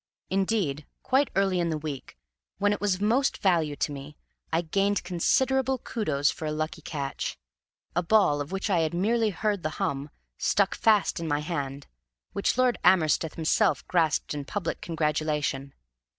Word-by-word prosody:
Indeed, 190 Hz, -7 st, 0 dB, 0.2 s
quite 270 Hz, +2 st, +2 dB
early 195 Hz, -2 st, +2 dB
in 170 Hz, -1 st, +1 dB
the 160 Hz, -, -1 dB
week, 145 Hz, -, -7 dB, 0.4 s
when 205 Hz, +1 st, +2 dB
it -, -, -5 dB
was 205 Hz, -2 st, +2 dB
of 190 Hz, -, -5 dB
most 255 Hz, +6 st, +2 dB
value 165 Hz, -6 st, +2 dB
to 145 Hz, -, -1 dB
me, 145 Hz, +1 st, -8 dB, 0.3 s
I 165 Hz, +1 st, +2 dB
gained 195 Hz, +4 st, 0 dB
considerable 265 Hz, +9 st, +1 dB
kudos 155 Hz, -, 0 dB
for 160 Hz, -, -7 dB
a -, -, -1 dB
lucky 155 Hz, +1 st, -3 dB
catch; 140 Hz, -3 st, -4 dB, 0.6 s
a 175 Hz, -, +3 dB
ball, 170 Hz, -6 st, +3 dB
of 145 Hz, -, -6 dB
which 195 Hz, +2 st, -2 dB
I 190 Hz, -5 st, +2 dB
had 160 Hz, 0 st, 0 dB
merely 220 Hz, +4 st, +2 dB
heard 205 Hz, 0 st, -1 dB
the 155 Hz, -, -1 dB
hum, 140 Hz, +1 st, -2 dB, 0.3 s
stuck -, -, +2 dB
fast 215 Hz, -6 st, +3 dB
in 165 Hz, -, -4 dB
my 145 Hz, -1 st, 0 dB
hand, 140 Hz, -3 st, -4 dB, 0.5 s
which 200 Hz, -, 0 dB
Lord 255 Hz, -2 st, +3 dB
Amersteth 165 Hz, -3 st, +3 dB
himself 160 Hz, -1 st, +1 dB
grasped 160 Hz, -5 st, +1 dB
in 145 Hz, -1 st, -4 dB
public 175 Hz, +4 st, -3 dB
congratulation. 150 Hz, -3 st, -1 dB
170 Hz, 165 wpm, -27 LUFS, 150-205 Hz, 0.6 s, a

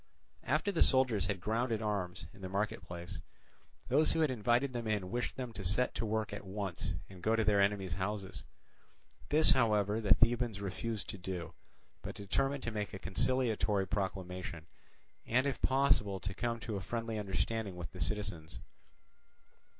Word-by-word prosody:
After 200 Hz, -, +1 dB
the 170 Hz, -, 0 dB
soldiers 125 Hz, -8 st, +4 dB
had 100 Hz, -2 st, -1 dB
grounded 115 Hz, +3 st, 0 dB
arms 100 Hz, -6 st, -2 dB
in 100 Hz, -, -15 dB
the 95 Hz, -, -5 dB
market 100 Hz, +2 st, -1 dB
place, 85 Hz, 0 st, -7 dB, 0.7 s
those 150 Hz, +5 st, +4 dB
who 160 Hz, -, +1 dB
had 155 Hz, -4 st, +3 dB
invited 120 Hz, +3 st, +2 dB
them 120 Hz, -2 st, -3 dB
in 105 Hz, -4 st, -1 dB
wished 120 Hz, +1 st, -1 dB
them 125 Hz, -3 st, -5 dB
to 100 Hz, -, -6 dB
set 100 Hz, +8 st, +2 dB
to 115 Hz, -, -2 dB
work 110 Hz, 0 st, -1 dB
at -, -, -5 dB
once 95 Hz, -2 st, -3 dB
and 95 Hz, -2 st, -12 dB
go 110 Hz, +5 st, +3 dB
to 110 Hz, -, +2 dB
their 100 Hz, -1 st, +4 dB
enemies' 100 Hz, -3 st, +1 dB
houses. 95 Hz, +2 st, -3 dB, 0.9 s
This, 155 Hz, +2 st, +6 dB
however, 105 Hz, -3 st, +3 dB
the 105 Hz, -, +6 dB
Thebans 115 Hz, -2 st, +2 dB
refused 100 Hz, +2 st, -3 dB
to 100 Hz, -, -5 dB
do, 90 Hz, -1 st, -5 dB, 0.5 s
but -, -, -6 dB
determined 135 Hz, +7 st, 0 dB
to 115 Hz, -, -2 dB
make 105 Hz, -2 st, -3 dB
a -, -, -4 dB
conciliatory 110 Hz, -2 st, +1 dB
proclamation, 90 Hz, -4 st, -3 dB, 0.6 s
and 125 Hz, +4 st, +3 dB
if 140 Hz, -, -1 dB
possible 130 Hz, -8 st, +3 dB
to 95 Hz, +1 st, -4 dB
come 115 Hz, +5 st, -2 dB
to 110 Hz, -3 st, -3 dB
a -, -, -4 dB
friendly 115 Hz, +3 st, -3 dB
understanding 105 Hz, 0 st, -1 dB
with 85 Hz, -1 st, -6 dB
the 90 Hz, -, -8 dB
citizens. 100 Hz, -7 st, -2 dB
105 Hz, 170 wpm, -34 LUFS, 95-120 Hz, 0.9 s, This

